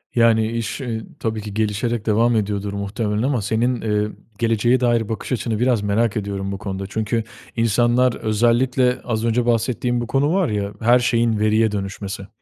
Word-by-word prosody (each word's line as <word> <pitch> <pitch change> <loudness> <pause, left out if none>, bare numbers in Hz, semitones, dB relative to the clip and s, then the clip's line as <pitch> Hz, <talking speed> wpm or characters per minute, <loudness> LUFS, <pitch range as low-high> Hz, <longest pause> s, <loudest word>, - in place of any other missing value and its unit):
Yani 115 -2 +3
iş, 115 +3 -3
iii, 115 -4 -4 0.2
tabii 110 -1 -2
ki 105 -1 -7
gelişerek 110 +2 -1
devam 115 +2 +3
ediyordur 100 -1 -1
muhtemelen 105 +2 -2
ama 130 -3 +1
senin, 115 +4 0
emm, 105 -1 -1 0.2
geleceğe 115 +2 +2
dair 120 -3 +1
bakış 110 - -5
açını 115 -3 -1
biraz 125 -3 +2
merak 105 +2 +1
ediyorum 100 -1 -3
bu 100 - -4
konuda. 95 -1 -5
Çünkü 110 +2 -1 0.3
insanlar 120 +2 +3
özellikle 120 +3 +1
az 115 -2 -2
önce 115 +1 +1
bahsettiğim 120 +1 0
bir 120 - -4
konu 140 +6 +1
var 190 -4 +2
ya, 100 -1 -2
her 120 +2 +4
şeyin, 115 -2 +1
veriye 110 +1 +3
dönüşmesi. 100 -1 -5
115 Hz, 170 wpm, -21 LUFS, 105-120 Hz, 0.3 s, her